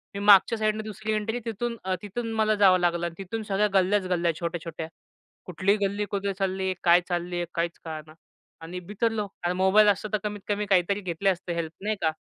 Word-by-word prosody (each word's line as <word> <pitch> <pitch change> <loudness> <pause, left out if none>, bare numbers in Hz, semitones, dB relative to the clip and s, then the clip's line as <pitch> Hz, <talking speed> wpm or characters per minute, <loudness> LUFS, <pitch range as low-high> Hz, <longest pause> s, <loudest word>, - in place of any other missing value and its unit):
मी - - -3
मागच्या 205 +3 +7
साईडनं 215 0 0
दुसरी 215 +1 -5
एंट्री 220 +3 -1
तिथून 230 +1 -3
अ, 185 0 0
तिथून 225 +3 -4
मला 215 -1 +2
जावं 190 -3 +5
लागलं. 170 -1 +1
तिथून 215 +3 -5
सगळ्या 205 +1 +1
गल्ल्याच 195 0 +2
गल्ल्या 175 -2 +1
छोट्या-छोट्या. 170 -1 -4 0.6
कुठली 185 +3 +1
गल्ली 205 +1 -1
कुठे 200 0 -1
चालली 190 0 -2
आहे, 185 - 0
काय 175 0 +6
चालली 175 0 -2
आहे? 175 0 -1
काहीच 170 0 -1
कळना 155 -1 -7 0.5
आणि 175 +3 -6
बिथरलो. 210 +3 -2 0.3
मोबाईल 190 +3 +5
असता 205 +1 +2
तर - - +4
कमीत 210 -1 -3
कमी 205 0 -1
काहीतरी 195 +1 +2
घेतली 185 +1 0
असते 180 -2 -2
हेल्प. 165 -2 -3
नाही 215 +1 0
का? 160 -1 +2
195 Hz, 190 wpm, -26 LUFS, 175-210 Hz, 0.6 s, मागच्या